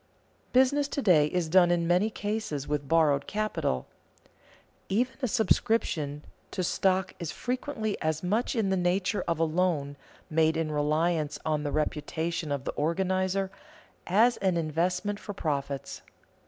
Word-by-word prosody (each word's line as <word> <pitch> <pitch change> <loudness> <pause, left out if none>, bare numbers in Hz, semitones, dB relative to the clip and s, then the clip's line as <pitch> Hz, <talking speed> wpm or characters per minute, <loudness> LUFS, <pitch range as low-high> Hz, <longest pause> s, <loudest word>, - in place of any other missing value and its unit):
_ - - -35
Business 270 +3 +3
to 285 - -3
day 155 -7 +5
is 175 +1 -1
done 175 +1 +5
in 175 -1 +2
many 180 +5 +3
cases 205 -10 -3
with 145 -1 -2
borrowed 150 -3 +3
capital. 185 - -1 1.0
Even 245 +6 +1
a 255 - +1
subscription 205 - +1 0.2
to 185 - -3
stock 185 +1 +1
is 170 -4 -4
frequently 245 -4 -3
as 155 +1 -1
much 215 +9 0
in 210 -4 +1
the 190 - +2
nature 180 +2 0
of 170 -2 0
a 165 - +2
loan, 160 -4 0 0.3
made 160 0 +2
in 160 -1 -1
reliance 150 +1 0
on 155 -1 0
the 145 -1 -3
reputation 155 +1 -2
of 140 -2 -2
the - - -1
organizer, 190 +4 0 0.6
as 225 +6 +4
an 190 -3 +1
investment 180 +6 -1
for 205 - -7
profits. 140 -5 -3
175 Hz, 150 wpm, -28 LUFS, 155-200 Hz, 1.0 s, day